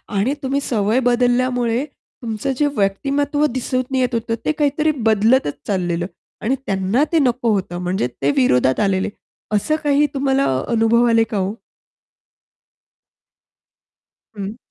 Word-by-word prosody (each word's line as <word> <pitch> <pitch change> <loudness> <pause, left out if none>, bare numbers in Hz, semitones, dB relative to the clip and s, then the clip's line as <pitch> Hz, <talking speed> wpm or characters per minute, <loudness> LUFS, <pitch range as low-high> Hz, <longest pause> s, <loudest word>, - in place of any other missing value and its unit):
आणि 210 +8 +1
तुम्ही 270 +1 0
सवय 220 -2 +1
बदलल्यामुळे 245 0 +1
तुमचं 245 -3 -6
जे 295 - +2
व्यक्तिमत्व 280 +9 0
दिसून 255 +1 -2
येत 255 -1 +1
होतं, 230 0 -1
ते - - +2
काहीतरी 300 0 +1 0.2
बदलतच 220 - +3
चाललेलं 175 -3 -1 0.4
आणि 250 +5 +1
त्यांना 195 +5 +1
ते 330 - +3
नको 245 -4 +1
होतं. 185 -3 -2
म्हणजे 180 -7 -1
ते - - +2
विरोधात 130 - +3
आलेले, 195 -2 +1 0.5
असं 305 +10 +1
काही 290 0 +3
तुम्हाला 275 0 +1 0.2
अनुभव 235 +1 +3
आले 230 0 +4
का 220 -3 -3
ओ? 190 +2 -1 2.8
हं. 200 +2 -5
240 Hz, 125 wpm, -19 LUFS, 200-270 Hz, 2.8 s, आले